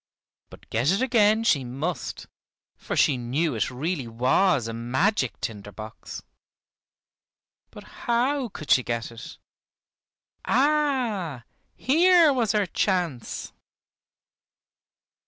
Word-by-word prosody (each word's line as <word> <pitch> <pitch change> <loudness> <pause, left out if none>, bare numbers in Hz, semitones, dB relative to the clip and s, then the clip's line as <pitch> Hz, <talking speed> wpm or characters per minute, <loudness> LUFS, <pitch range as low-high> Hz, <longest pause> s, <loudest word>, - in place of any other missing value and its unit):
But - - -15
get 120 +6 +1
it 200 +6 +1
again 220 -3 +3
she 145 - +2
must, 140 +8 -4 0.5
for - - -5
she 140 - +3
knew 135 +6 -1
it 110 -3 -1
really 140 +1 -3
was 125 - +2
a 115 - -5
magic 130 - 0
tinder 105 -2 -6
box. 110 +2 -9 1.5
But - - -12
how 250 +2 -1
could 155 -7 -7
she 125 - +6
get 120 -1 -4
it? 115 -1 -10 1.1
Ah! 250 - 0 0.3
here 335 +2 +4
was 230 -6 0
her 210 -2 +2
chance. 175 - -2
170 Hz, 105 wpm, -25 LUFS, -, 1.5 s, she